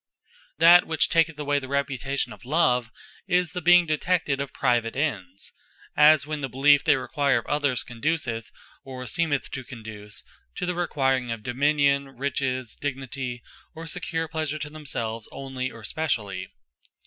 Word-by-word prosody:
That 170 +3 +7
which 160 -1 +1
taketh 165 -1 +2
away 145 -1 0
the 130 - -8
reputation 140 0 -1
of - - -15
Love, 125 -4 +2 0.4
is 180 -2 +2
the 180 -1 -4
being 175 +1 +6
detected 155 -2 0
of 140 - -4
private 120 -3 +1
ends: 100 - -3 0.4
as 150 0 +6
when 150 -1 -4
the 135 - -3
beliefe 140 +3 +5
they - - +5
require 140 0 +1
of 115 - -3
others, 145 -4 0
conduceth 120 -3 -2 0.3
or 130 -1 -7
seemeth 145 +3 -1
to 130 - -5
conduce 110 -4 -9 0.3
to - - -3
the 180 0 -2
acquiring 135 -7 +1
of 115 -2 -4
Dominion, 140 +1 +1
Riches, 130 -3 -2
Dignity, 130 -3 -4 0.3
or 165 +1 -7
secure 165 0 -3
Pleasure, 155 -1 -3
to 150 -1 -6
themselves 115 -7 -5
onely, 130 -1 -4
or 115 -2 -12
specially. 105 -11 -2
140 Hz, 150 wpm, -25 LUFS, 125-155 Hz, 0.4 s, That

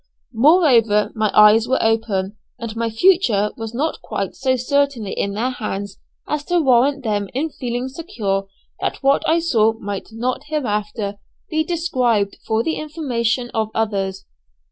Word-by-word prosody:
Moreover, 235 - +4
my 215 -1 0
eyes 215 +2 +7
were 260 - +2
open, 215 -3 0 0.2
and 230 -2 -6
my 230 0 -1
future 225 - +3
was 225 0 -6
not 305 +6 -2
quite 195 -2 -4
so 260 -1 0
certainly 260 -4 0
in 200 0 -2
their 245 +5 0
hands 200 -4 -5 0.3
as 300 -1 -2
to 350 0 +2
warrant 275 0 +3
them 205 -3 -1
in 305 +4 -1
feeling 245 -1 -3
secure 220 - -3 0.3
that - - -3
what 275 +1 +4
I 325 - +4
saw 225 -10 +2
might 205 -3 -6
not 250 +5 -3
hereafter 210 -7 -2 0.3
be 315 0 +1
described 255 - 0
for 220 0 +1
the 320 - -1
information 250 -6 -2
of 220 -1 0
others. 195 -3 -2
230 Hz, 150 wpm, -20 LUFS, 210-280 Hz, 0.3 s, eyes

